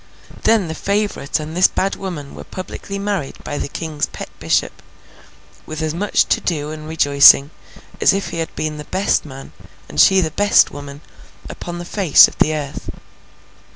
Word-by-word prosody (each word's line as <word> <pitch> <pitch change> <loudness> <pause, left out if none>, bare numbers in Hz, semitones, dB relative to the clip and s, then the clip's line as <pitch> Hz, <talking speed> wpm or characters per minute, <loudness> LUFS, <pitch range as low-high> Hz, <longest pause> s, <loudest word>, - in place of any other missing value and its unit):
Then 220 -5 +3
the 160 - -4
favourite 200 -6 -2
and 155 +1 -7
this 180 - +5
bad 195 +1 -2
woman 165 -8 -7
were - - -9
publicly 195 +1 -7
married 200 -7 -3
by 145 - -4
the - - -3
King's 155 0 -4
pet - - -9
bishop, - - -1 0.9
with 155 -1 -6
as 155 -1 -2
much 200 +5 +1
to - - +1
do 150 -3 -2
and 155 0 -8
rejoicing, 145 -2 +5 0.5
as - - +6
if 195 0 -2
he 165 - -5
had 165 - -4
been 155 -1 -3
the 150 - -8
best 190 +1 0
man, 135 -2 -10 0.4
and 75 +1 +2
she 190 - +6
the 160 -4 0
best 205 +5 +3
woman, 145 0 -9 0.5
upon 175 0 -7
the 175 - -7
face 185 -3 +6
of - - -12
the 155 - +3
earth. 145 -2 -6
160 Hz, 180 wpm, -19 LUFS, 145-190 Hz, 0.9 s, as